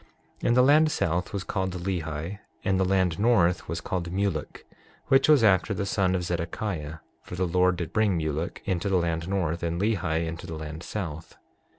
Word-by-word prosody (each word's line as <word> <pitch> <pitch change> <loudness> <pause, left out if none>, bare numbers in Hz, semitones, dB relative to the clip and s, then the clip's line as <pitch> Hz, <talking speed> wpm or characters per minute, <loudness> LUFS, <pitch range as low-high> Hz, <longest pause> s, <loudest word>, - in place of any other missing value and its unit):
6:10 - - -18
Now - - +4
the 125 - +6
land 155 +3 +5
south 90 - -1
was 100 -2 -3
called 95 -1 -2
Lehi 85 0 -3 0.2
and 95 -2 +1
the - - +3
land 95 -2 +1
north 90 -8 +3
was 85 +1 -3
called 85 -1 -3
Mulek, 95 -5 -2 0.4
which 135 +2 +5
was 145 -6 +6
after 100 0 +3
the 100 - -2
son 95 -1 +1
of 90 - -1
Zedekiah; 85 -2 -3 0.2
for - - -8
the 95 +1 0
Lord 90 +1 +2
did 85 -2 -5
bring 105 -5 +2
Mulek 80 +1 -3
into 95 0 -1
the 95 - +3
land 85 -1 -1
north, 85 -4 -1
and 85 0 -2
Lehi 90 -6 0
into 80 0 -6
the 80 - -5
land 80 +1 -7
south. 80 -6 -6
90 Hz, 195 wpm, -26 LUFS, 85-100 Hz, 0.4 s, the